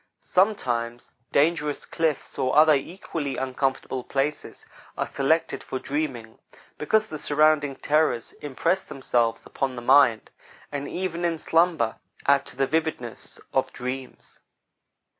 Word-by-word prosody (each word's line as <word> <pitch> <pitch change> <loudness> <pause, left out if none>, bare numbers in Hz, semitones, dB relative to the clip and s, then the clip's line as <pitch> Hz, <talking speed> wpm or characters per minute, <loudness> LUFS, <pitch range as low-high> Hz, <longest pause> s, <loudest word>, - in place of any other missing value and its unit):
Sometimes 120 - 0 0.2
dangerous 150 0 +1
cliffs, 160 -4 -2
or 130 - +1
other 155 0 +7
equally 145 -1 -3
uncomfortable 130 -1 -2
places, 140 +4 -2 0.3
are - - 0
selected 160 +4 0
for - - -4
dreaming, 135 -5 -4 0.4
because 215 +8 +2
the 155 -8 -6
surrounding 145 -2 +3
terrors 150 -6 +1
impress 150 +6 0
themselves 120 -6 -1
upon 135 -2 -2
the 120 - -6
mind, 130 -4 +4 0.4
and 145 -1 -4
even 175 -2 -3
in 170 -1 +1
slumber 165 -8 +2 0.3
add 140 0 +3
to - - -7
the 135 +1 +2
vividness 155 -5 -3
of - - +1
dreams. 130 +1 -6
145 Hz, 120 wpm, -25 LUFS, 130-160 Hz, 0.4 s, other